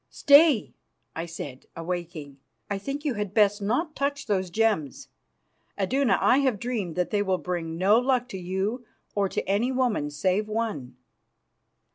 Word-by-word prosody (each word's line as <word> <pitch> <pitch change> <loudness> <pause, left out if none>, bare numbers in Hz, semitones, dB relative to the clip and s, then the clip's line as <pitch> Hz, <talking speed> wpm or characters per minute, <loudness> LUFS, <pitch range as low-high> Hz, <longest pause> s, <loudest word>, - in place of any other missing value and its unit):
"Stay," 285 -4 +5 0.4
I 165 +1 -4
said, 145 -6 -8
awaking. 165 -4 -5 0.3
"I 200 - -1
think 275 +8 -5
you 285 - +1
had 205 -3 -4
best 205 -1 +3
not 280 - -1
touch 280 +1 -2
those 190 -4 -1
gems. 205 - -1 0.7
Iduna, 240 +1 +2
I 260 - +4
have 260 -6 +1
dreamed 210 -7 -3
that 180 -1 -1
they 205 - +1
will 190 -2 +1
bring 170 -3 -4
no 200 +6 +4
luck 250 -1 +1
to 190 - -6
you 190 +7 -2 0.3
or 200 -2 0
to - - -3
any 210 +7 +1
woman, 245 - 0
save 185 +8 0
one." 210 - -3
205 Hz, 155 wpm, -26 LUFS, 180-245 Hz, 0.7 s, Stay